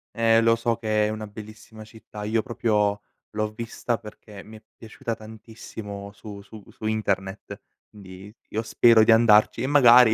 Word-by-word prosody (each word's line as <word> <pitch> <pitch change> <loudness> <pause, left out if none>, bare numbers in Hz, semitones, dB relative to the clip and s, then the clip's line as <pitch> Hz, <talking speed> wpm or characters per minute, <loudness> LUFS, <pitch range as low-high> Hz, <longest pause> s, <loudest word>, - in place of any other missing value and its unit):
Eh 115 0 +3
lo 115 0 +3
so 115 0 -1
che 110 -2 0
è - - -1
una 110 0 -6
bellissima 110 +1 -12
città. 110 -1 -11
Io 110 +2 0
proprio 105 -3 -1 0.3
l'ho 105 0 -3
vista 115 +1 -4
perché 105 -1 -13
mi 110 +1 -13
è 110 - -20
piaciuta 115 +1 -6
tantissimo 110 -2 -10
su 100 -1 -11
su 105 +1 -14
su - - -11
internet, 100 -3 -3 0.3
quindi 95 0 -13 0.2
io 110 - -2
spero 115 0 +5
di 110 - +4
andarci 110 -2 +4
e 130 - -1
magari 125 -5 +6
110 Hz, 165 wpm, -24 LUFS, 105-115 Hz, 0.3 s, magari